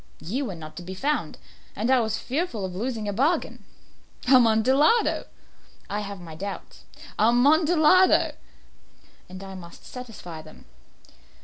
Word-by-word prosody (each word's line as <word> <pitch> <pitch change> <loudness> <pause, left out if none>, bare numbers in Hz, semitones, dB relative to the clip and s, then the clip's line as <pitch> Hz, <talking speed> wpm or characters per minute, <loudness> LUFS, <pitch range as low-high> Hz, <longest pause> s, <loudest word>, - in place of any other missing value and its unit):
You 240 - -3
were 195 -7 -5
not 155 -1 -10
to - - -6
be 185 +2 -7
found, 295 +9 -2 0.4
and 230 +4 0
I 260 - +5
was 220 -2 -1
fearful 260 - -3
of 180 -1 -6
losing 225 +1 -3
a 205 - -2
bargain." 280 - 0 0.6
"Amontillado!" 260 - +4 0.6
"I 205 - -1
have 200 -1 -6
my 170 -2 -10
doubts." 195 +5 -8 0.3
"Amontillado!" 310 - +4 1.0
"And 185 +1 -9
I 195 0 -8
must 175 -2 -12
satisfy 215 -10 -9
them." 155 0 -16
220 Hz, 130 wpm, -25 LUFS, 190-270 Hz, 1.0 s, I